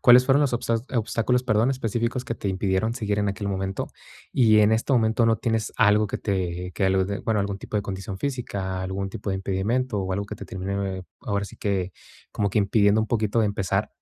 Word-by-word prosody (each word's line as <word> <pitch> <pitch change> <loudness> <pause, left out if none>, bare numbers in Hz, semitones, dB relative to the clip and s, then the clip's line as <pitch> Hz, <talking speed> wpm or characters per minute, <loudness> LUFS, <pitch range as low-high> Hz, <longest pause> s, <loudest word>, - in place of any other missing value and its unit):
cuáles 125 +1 +8
fueron 140 +2 +4
los 140 -4 +1
obstas 115 -1 0
obstáculos, 120 +2 +1
perdón, 115 0 +2
específicos 120 0 -1
que 115 -4 -4
te - - -5
impidieron 95 +3 0
seguir 105 -4 -1
en 100 -1 +1
aquel 100 +1 -3
momento? 95 -1 -2 0.4
Y 110 -4 +5
en 105 0 +5
este 110 +5 +1
momento 115 -1 +3
no 115 0 +4
tienes 115 -1 -1
algo 105 0 +4
que - - -4
te 90 -3 -2
que 95 - -1
alud 95 0 +2
bueno, 110 -2 +1
¿algún 100 0 -2
tipo 105 - -4
de 105 - 0
condición 95 -1 -5
física, 100 -9 -3
algún 95 +1 -3
tipo 100 - -4
de 95 - 0
impedimento 105 +5 -1
o 95 -1 -2
algo 100 +2 -1
que 105 - -7
te 100 - -8
termine, 95 0 -3 0.2
ahora 100 -1 -1
sí 100 - -11
que, 95 -3 -1 0.4
como 100 - 0
que 105 - +1
impidiendo 100 +1 +3
un 110 - 0
poquito 110 0 +1
empezar? 100 -3 0
105 Hz, 210 wpm, -25 LUFS, 95-115 Hz, 0.4 s, cuáles